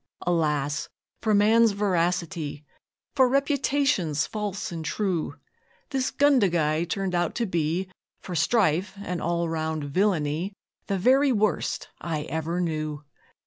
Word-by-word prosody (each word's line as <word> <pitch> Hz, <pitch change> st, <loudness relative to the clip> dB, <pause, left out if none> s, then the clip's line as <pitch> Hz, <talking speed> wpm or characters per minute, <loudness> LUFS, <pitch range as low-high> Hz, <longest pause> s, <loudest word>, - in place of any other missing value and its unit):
Alas 150 Hz, -4 st, 0 dB, 0.3 s
for 215 Hz, -2 st, +2 dB
man's 220 Hz, +2 st, +5 dB
veracity! 175 Hz, -6 st, -1 dB, 0.5 s
For 260 Hz, -3 st, +4 dB
reputations 275 Hz, -, +1 dB
false 205 Hz, -3 st, -4 dB
and 165 Hz, -2 st, -5 dB
true! 180 Hz, -1 st, -1 dB, 0.6 s
This 265 Hz, -2 st, 0 dB
'Gundagai' 175 Hz, -, +2 dB
turned 195 Hz, -2 st, -2 dB
out 175 Hz, -1 st, 0 dB
to 235 Hz, -, 0 dB
be, 170 Hz, 0 st, -1 dB, 0.3 s
For 180 Hz, -, -7 dB
strife 185 Hz, +1 st, +2 dB
and 180 Hz, -4 st, -3 dB
all 170 Hz, 0 st, 0 dB
round 160 Hz, -1 st, -2 dB
villainy, 165 Hz, +2 st, 0 dB, 0.3 s
The 195 Hz, -, 0 dB
very 265 Hz, +8 st, +4 dB
worst 215 Hz, -3 st, 0 dB
I 155 Hz, -3 st, -3 dB
ever 160 Hz, +4 st, -3 dB
knew! 155 Hz, -3 st, -2 dB
175 Hz, 120 wpm, -26 LUFS, 160-210 Hz, 0.6 s, man's